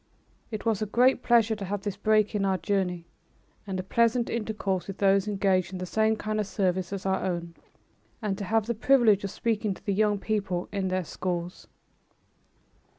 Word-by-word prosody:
It 215 Hz, -1 st, -6 dB
was 220 Hz, -2 st, +1 dB
a 215 Hz, -, -1 dB
great 250 Hz, +4 st, +3 dB
pleasure 230 Hz, -3 st, +3 dB
to 205 Hz, -2 st, -6 dB
have 200 Hz, +1 st, -3 dB
this 205 Hz, -2 st, -3 dB
break 215 Hz, +1 st, +2 dB
in 205 Hz, -2 st, 0 dB
our 190 Hz, -1 st, +1 dB
journey 185 Hz, -4 st, -1 dB, 0.6 s
and 190 Hz, -1 st, -3 dB
the 185 Hz, -, -3 dB
pleasant 235 Hz, +4 st, +1 dB
intercourse 210 Hz, -5 st, -2 dB
with 195 Hz, -, -6 dB
those 195 Hz, 0 st, +3 dB
engaged 195 Hz, -3 st, +1 dB
in -, -, -4 dB
the 185 Hz, -, -4 dB
same 220 Hz, +4 st, +2 dB
kind 215 Hz, 0 st, -3 dB
of 210 Hz, -, -1 dB
service 185 Hz, -2 st, -1 dB
as 195 Hz, -1 st, -5 dB
our 190 Hz, 0 st, 0 dB
own, 170 Hz, -2 st, -3 dB, 0.7 s
and 210 Hz, -4 st, -2 dB
to 200 Hz, -, -3 dB
have 220 Hz, +2 st, +1 dB
the 235 Hz, -, -1 dB
privilege 230 Hz, -4 st, +4 dB
of 200 Hz, -, -2 dB
speaking 215 Hz, -1 st, -1 dB
to -, -, -18 dB
the 200 Hz, -, 0 dB
young 210 Hz, +1 st, +2 dB
people 195 Hz, -4 st, -2 dB
in 195 Hz, -2 st, -1 dB
their 185 Hz, -1 st, -1 dB
schools. 175 Hz, +1 st, -4 dB
200 Hz, 195 wpm, -27 LUFS, 190-215 Hz, 0.7 s, privilege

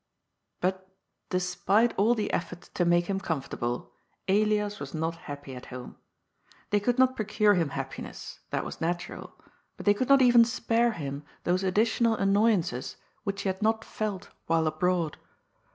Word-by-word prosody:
But, 190 Hz, +1 st, -1 dB, 0.4 s
despite 185 Hz, +5 st, +2 dB
all 225 Hz, +5 st, +3 dB
the 210 Hz, -2 st, -2 dB
efforts 175 Hz, 0 st, -4 dB
to 175 Hz, -, 0 dB
make 175 Hz, 0 st, +3 dB
him 195 Hz, +1 st, -1 dB
comfortable, 135 Hz, -8 st, -3 dB, 0.3 s
Elias 210 Hz, +1 st, +2 dB
was 145 Hz, +2 st, -6 dB
not 160 Hz, +1 st, -1 dB
happy 145 Hz, -2 st, -7 dB
at 125 Hz, -, -10 dB
home. 125 Hz, -1 st, -8 dB, 0.8 s
They 205 Hz, -, +4 dB
could 245 Hz, +4 st, 0 dB
not 260 Hz, 0 st, +4 dB
procure 210 Hz, -1 st, +3 dB
him 170 Hz, -6 st, +1 dB
happiness 135 Hz, -1 st, -6 dB
— -, -, -43 dB
^that -, -, -1 dB
was -, -, -7 dB
natural 175 Hz, +2 st, -3 dB, 0.2 s
— -, -, -42 dB
^but -, -, -9 dB
they 205 Hz, -, +6 dB
could 255 Hz, +6 st, -2 dB
not 275 Hz, -1 st, +7 dB
even 240 Hz, -1 st, +7 dB
spare 235 Hz, 0 st, +1 dB
him 140 Hz, -4 st, -5 dB, 0.2 s
those 180 Hz, +2 st, +1 dB
additional 225 Hz, +4 st, +2 dB
annoyances 195 Hz, -, +1 dB, 0.3 s
which 200 Hz, -1 st, -2 dB
he 195 Hz, -, 0 dB
had 190 Hz, +1 st, -3 dB
not 220 Hz, +1 st, +1 dB
felt 210 Hz, -4 st, -4 dB, 0.2 s
while 165 Hz, 0 st, +2 dB
abroad. 165 Hz, 0 st, 0 dB
190 Hz, 165 wpm, -28 LUFS, 165-215 Hz, 0.8 s, not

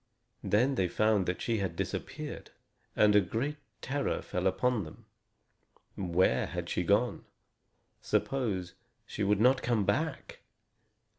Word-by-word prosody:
Then 110 Hz, +7 st, +2 dB
they 95 Hz, -8 st, +1 dB
found 105 Hz, 0 st, +2 dB
that 90 Hz, -, -2 dB
she 115 Hz, -2 st, 0 dB
had 95 Hz, -4 st, -2 dB
disappeared, -, -, -5 dB, 0.5 s
and 105 Hz, -1 st, +5 dB
a 105 Hz, -, +7 dB
great 120 Hz, -, -2 dB, 0.2 s
terror 140 Hz, +1 st, -2 dB
fell -, -, -1 dB
upon 125 Hz, -4 st, +1 dB
them. 80 Hz, -, -12 dB, 0.9 s
Where 90 Hz, -8 st, +1 dB
had -, -, -5 dB
she -, -, 0 dB
gone? -, -, +1 dB, 0.8 s
Suppose 100 Hz, -10 st, -1 dB, 0.3 s
she -, -, -6 dB
should 100 Hz, 0 st, +2 dB
not 125 Hz, +3 st, +4 dB
come 115 Hz, -5 st, +1 dB
back! 155 Hz, +10 st, -2 dB
105 Hz, 130 wpm, -31 LUFS, 95-125 Hz, 0.9 s, a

